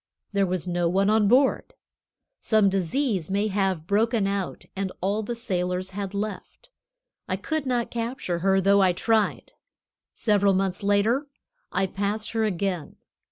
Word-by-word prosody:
There 200 -1 +2
was 180 -1 -2
no 175 -1 +1
one 195 +3 +2
on 215 -1 +4
board. 260 +5 +2 0.6
Some 215 -3 +3
disease 195 - -1
may 200 +2 0
have 190 -5 0
broken 215 +3 +2
out, 195 -1 -3
and 195 -1 -2
all 200 +4 0
the 235 +2 -4
sailors 180 -3 -2
had 200 0 -5
left. 215 - -6 0.6
I - - -1
could 315 -3 -3
not 245 -2 0
capture 230 -7 -3
her, 195 +2 +3
though 200 +1 +4
I 185 -2 +4
tried. 220 +3 0 0.6
Several 200 -3 +2
months 190 -1 -1
later 210 +8 +2 0.4
I 190 +1 +1
passed 205 +3 -2
her 225 -1 +1
again. 185 -5 -2
200 Hz, 150 wpm, -25 LUFS, 190-220 Hz, 0.6 s, on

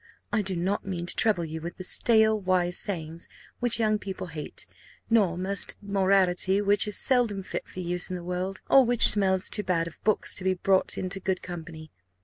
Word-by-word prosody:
I 225 - +2
do 190 -2 -3
not 185 +4 -2
mean 180 -3 -5
to - - -3
trouble 200 -7 +2
you 160 0 -7
with 170 +2 -7
stale 220 +1 +3
wise 180 -2 0
sayings, 165 -4 -3 0.3
which 245 -1 +1
young 215 -1 +1
people 190 -2 -6
hate; 160 -3 -8 0.5
nor 195 -7 +3
musty 195 +2 -2
morality, 195 -1 +1
which 205 0 +2
is 210 - -1
seldom 235 -7 +1
fit - - -6
for 185 - -8
use 175 0 -2
in 185 - -4
the 175 - -7
world, 180 +2 -4
or 270 - +6
which 240 -1 +7
smells 190 -2 +2
too 210 - -1
much 165 -2 +1
of 170 - -11
books 215 -1 0
to 185 - -4
be 190 0 +1
brought 190 +1 +1
into 185 +1 -3
good 190 -1 -3
company. 165 -3 -9
190 Hz, 195 wpm, -26 LUFS, 175-205 Hz, 0.5 s, which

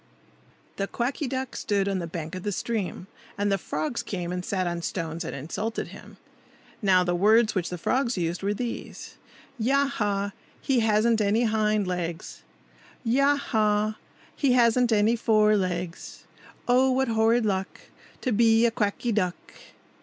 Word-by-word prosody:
THE 195 - -1
Quacky 260 +6 -2
Duck 260 0 -4
stood 200 -2 0
on 195 -1 0
the 170 - -4
bank 160 -1 -6
of 185 - -5
the 205 - -2
stream. 205 -3 -3 0.3
And 205 0 0
the 195 - +1
frogs 155 +7 -3
came 180 -3 -4
and 180 0 -3
sat 185 0 -1
on 175 -1 -2
stones 165 -1 -4
and - - -5
insulted 205 +11 -4
him. - - -13 0.6
Now 185 -3 +4
the 175 0 0
words 215 +5 +4
which 180 -3 -1
the 180 - -5
frogs 250 +6 0
used 170 0 -2
were 200 +1 -1
these,— 240 +2 -6 0.4
"Ya! 275 +5 +3
ha! 205 -6 -1 0.3
he 265 -3 +1
hasn't 220 0 +3
any 210 +3 +2
hind 215 -2 +1
legs! 175 -2 -4 0.6
Ya! 275 +4 +3
ha! 215 -5 0 0.4
he 275 -4 +2
hasn't 245 0 +4
any 215 +2 +3
fore 215 -2 +3
legs! 180 -3 -3 0.4
Oh! 255 +2 +4
what 260 0 +1
horrid 225 +1 +3
luck 190 -2 -2 0.4
To 255 - -1
be 225 +1 +4
a 235 - +3
Quacky 220 +2 -1
Duck!" 185 -5 0
210 Hz, 160 wpm, -26 LUFS, 185-235 Hz, 0.6 s, Now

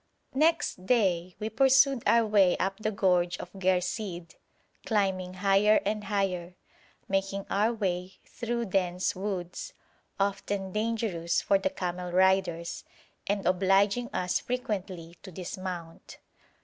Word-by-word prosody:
Next 310 - +1
day 185 -7 +2
we 215 +1 -3
pursued 265 +1 +4
our 230 -1 +5
way 200 -4 +4
up 195 +1 -1
the 215 - -1
gorge 180 -4 +1
of 180 - -9
Ghersìd, 180 -2 -1 0.5
climbing 190 -4 0
higher 200 +2 +4
and 210 +1 -1
higher, 185 -3 -1 0.5
making 195 0 -1
our 210 +3 +2
way 185 -4 -3
through 235 -1 -3
dense 185 -2 0
woods, 185 -2 -4 0.5
often 195 -1 -1
dangerous 215 -6 -1
for 195 - +2
the 190 0 0
camel 180 -1 -4
riders, 185 -2 +1 0.4
and 200 0 -1
obliging 195 +5 +2
us 180 0 0
frequently 190 -8 -4
to 190 - -10
dismount. 180 -2 -7
195 Hz, 120 wpm, -28 LUFS, 180-210 Hz, 0.5 s, our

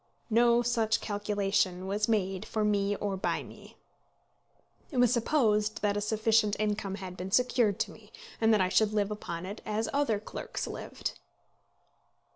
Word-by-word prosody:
No 235 +1 +4
such 230 -2 +1
calculation 200 -3 0
was 205 +2 0
made 195 -4 0
for 215 -1 -1
me 205 -1 +1
or 200 -1 -2
by 190 - -1
me. - - -14 1.1
It 275 - -6
was 245 -1 +5
supposed 220 -5 +1
that 205 -1 +2
a 205 - -1
sufficient 215 0 +2
income 205 -2 -1
had 185 -2 -7
been 185 +1 -5
secured 240 -2 +2
to - - -1
me, - - -16 0.3
and 225 0 +4
that 215 -3 +4
I 185 - +2
should 215 +2 +3
live 210 -1 +1
upon 175 -5 -5
it 200 +3 -7
as 215 +1 -2
other 275 -7 +1
clerks 215 - -5
lived. - - -6
210 Hz, 160 wpm, -30 LUFS, 200-225 Hz, 1.1 s, was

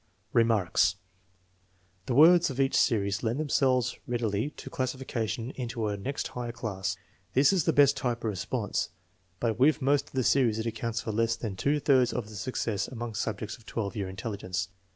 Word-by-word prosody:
Remarks. 115 -7 +3 1.1
The 120 - 0
words 170 +4 +7
of 135 0 -6
each 135 0 +2
series 100 -4 +2
lend 115 +4 -1
themselves 130 -5 +1
read 120 -1 -2
ily 110 +5 0
to - - -8
classification, 130 -3 -3
into 120 -4 -4
a 105 - -1
next 130 +8 -4
higher 120 -1 -5
class. 110 -5 -3 0.4
This 140 +7 +5
is 185 - +1
the 165 - +4
best 145 -3 +5
type 120 -2 -2
of 110 - 0
response, 95 -3 -2 0.5
but 115 -1 -1
with 150 +4 +4
most 140 +1 +2
of - - -19
the 130 -1 +1
series 120 -4 +3
it 110 - -3
accounts 115 0 -2
for 110 - -4
less 115 +1 +1
than 110 -4 -5
two 145 +9 +1
thirds 130 -4 +3
of 115 -4 -3
the 110 - -10
successes 110 -2 -2
among 120 -2 -6
subjects 110 0 -3
of 115 - -22
12 105 -1 -3
year 100 -3 -3
intelligence. 95 -1 -4
115 Hz, 185 wpm, -28 LUFS, 110-130 Hz, 1.1 s, words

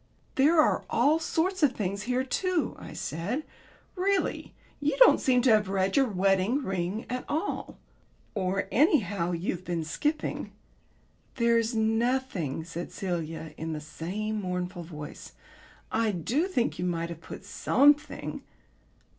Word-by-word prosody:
"There 305 +4 +4
are 310 - +4
all 310 +3 +3
sorts 350 +3 0
of 285 -4 +4
things 200 -2 -2
here 250 +1 +2
too," 360 +6 0
I - - -9
said. 205 - -3 0.5
"Really, 385 0 0 0.2
you 295 +11 0
don't - - +8
seem 250 -3 +3
to 255 - +5
have 210 -2 +4
read 190 0 +1
your 270 -2 +4
wedding 195 +6 +2
ring 190 +2 -2
at 250 0 -3
all. 320 +7 -2 0.6
Or, 195 -1 -1
anyhow, 205 - +3
you've 175 +1 -2
been 170 -3 -2
skipping." 295 - -2 0.8
"There's 235 -1 +2
nothing," 225 - 0
said 170 +1 -6
Celia 165 -4 -4
in 160 0 -4
the 155 - -3
same 200 +8 -4
mournful 180 -1 -3
voice. 150 -3 -9 0.6
"I 225 0 +2
do 225 - 0
think 250 -11 0
you 180 - -1
might 170 -1 -1
have 165 -1 -8
put 190 - -9
something." 285 +8 +2
215 Hz, 140 wpm, -28 LUFS, 180-270 Hz, 0.8 s, don't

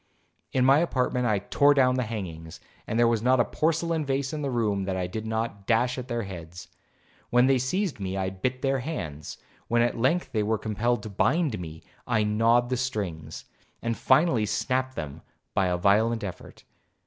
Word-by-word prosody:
In 130 -1 +2
my 135 +3 +6
apartment 125 -6 0
I 105 -2 +2
tore 145 +8 +3
down 130 -2 +4
the 130 - 0
hangings, 85 -8 -6 0.3
and 110 - -2
there 120 0 +5
was 115 -2 +1
not 130 +2 +3
a - - +4
porcelain 165 0 0
vase 135 0 -1
in 155 - -3
the 140 - -1
room 105 -6 0
that 95 -1 -2
I 90 - -1
did 110 +5 -5
not 110 -3 -3
dash 120 +3 +2
at 125 - -7
their 120 -2 -2
heads. 90 -3 -9 0.6
When 125 +1 +4
they 135 -1 +3
seized 160 - -1
me, 95 -1 -3
I 95 -1 -1
bit 125 +7 -3
their 135 0 +1
hands; 80 - -5 0.3
when 120 0 +3
at 120 - 0
length 150 +9 +1
they 110 - 0
were 110 +1 +1
compelled 115 +3 -1
to 110 - -6
bind 135 - +1
me, 80 -2 -8 0.2
I 115 -3 +2
gnawed 115 +3 +3
the 130 - +1
strings, 100 -11 -4 0.3
and 115 -1 -2
finally 130 -8 +3
snapt 130 +4 -1
them 75 0 -6 0.3
by 95 - +2
a 90 -1 0
violent 110 +5 +2
effort. 90 -4 -8
115 Hz, 195 wpm, -26 LUFS, 100-130 Hz, 0.6 s, my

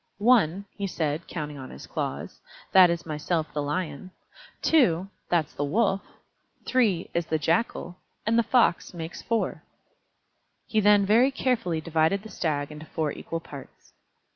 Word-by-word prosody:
"One," 200 -4 +3
he 200 - -3
said, 160 -2 -2
counting 150 -4 -5
on 130 - -8
his - - -10
claws, - - -5 0.3
"that 185 -2 +8
is 170 0 -2
myself 155 0 -2
the 150 - -1
Lion. 150 +2 -3 0.5
Two, 195 - +3 0.2
that's 165 -4 +1
the 145 - -2
Wolf, 195 +6 +1 0.6
three, 215 -9 +1
is 170 -1 -1
the 160 - +1
Jackal, 170 - -1 0.3
and 225 +2 +2
the 235 - +5
Fox 230 -7 +2
makes 165 0 -6
four." 230 -1 -1 1.0
He 220 - +1
then 205 -1 +5
very 230 +6 +5
carefully 230 -12 -1
divided 165 +4 +1
the 220 - -9
Stag 145 -3 -2
into 150 +1 -10
four 155 -3 -2
equal 165 +3 -5
parts. 140 -4 -12
170 Hz, 150 wpm, -26 LUFS, 155-205 Hz, 1.0 s, that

